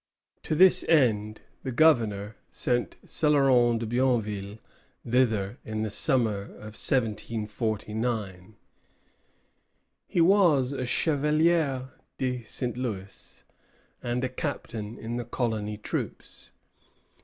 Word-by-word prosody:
To 155 Hz, -, -2 dB
this 185 Hz, +2 st, +6 dB
end 110 Hz, -9 st, +2 dB, 0.2 s
the 130 Hz, -, -4 dB
Governor 115 Hz, -8 st, +2 dB
sent 120 Hz, -1 st, -1 dB
Céloron 135 Hz, -6 st, +3 dB
de 115 Hz, -, -3 dB
Bienville 110 Hz, -4 st, -1 dB, 0.5 s
thither 115 Hz, -3 st, +1 dB
in 110 Hz, 0 st, -3 dB
the 110 Hz, -, -3 dB
summer 115 Hz, -7 st, +1 dB
of 110 Hz, 0 st, -10 dB
1749. 110 Hz, -3 st, -2 dB, 1.5 s
He -, -, -1 dB
was 165 Hz, -8 st, +4 dB
a 130 Hz, -2 st, -3 dB
chevalier 150 Hz, -1 st, +1 dB, 0.3 s
de 125 Hz, -1 st, -2 dB
St. 120 Hz, +2 st, -4 dB
Louis 100 Hz, -6 st, -6 dB, 0.6 s
and 120 Hz, +1 st, -2 dB
a 130 Hz, -, 0 dB
captain 115 Hz, -5 st, -5 dB
in 115 Hz, +2 st, -5 dB
the 120 Hz, -, -4 dB
colony 110 Hz, -3 st, -2 dB
troops. 105 Hz, -, -6 dB
120 Hz, 100 wpm, -27 LUFS, 110-135 Hz, 1.5 s, this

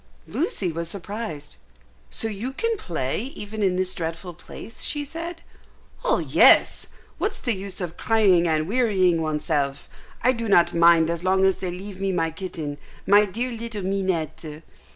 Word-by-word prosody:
Lucy 200 Hz, -, -1 dB
was 165 Hz, +1 st, -4 dB
surprised. 195 Hz, -5 st, -6 dB, 0.5 s
"So 225 Hz, -, -1 dB
you 225 Hz, +5 st, -4 dB
can 460 Hz, +10 st, 0 dB
play 170 Hz, -, -3 dB
even 210 Hz, +1 st, -6 dB
in 190 Hz, -3 st, +2 dB
this 185 Hz, 0 st, 0 dB
dreadful 165 Hz, +2 st, -5 dB
place?" 225 Hz, +7 st, -11 dB
she 295 Hz, -1 st, -2 dB
said. 330 Hz, +3 st, -7 dB, 0.6 s
"Oh -, -, +3 dB
yes! -, -, +5 dB, 0.3 s
What's -, -, -1 dB
the 240 Hz, -, 0 dB
use 195 Hz, -1 st, -6 dB
of 175 Hz, -3 st, -5 dB
crying 195 Hz, -6 st, +3 dB
and 155 Hz, -1 st, +1 dB
wearying 190 Hz, -7 st, +2 dB
oneself? 150 Hz, -2 st, -1 dB, 0.4 s
I 250 Hz, -, +5 dB
do 230 Hz, -3 st, -3 dB
not 175 Hz, -3 st, +5 dB
mind 170 Hz, -1 st, +5 dB
as 170 Hz, 0 st, -4 dB
long 190 Hz, +1 st, +3 dB
as 190 Hz, -, +2 dB
they 185 Hz, -, -3 dB
leave 190 Hz, +2 st, -7 dB
me 195 Hz, -1 st, +1 dB
my 165 Hz, -3 st, 0 dB
kitten, 160 Hz, -4 st, -6 dB, 0.3 s
my 205 Hz, +1 st, +6 dB
dear 235 Hz, +6 st, -3 dB
little 230 Hz, -3 st, -5 dB
Minette." 170 Hz, -5 st, -2 dB
185 Hz, 160 wpm, -24 LUFS, 165-220 Hz, 0.6 s, my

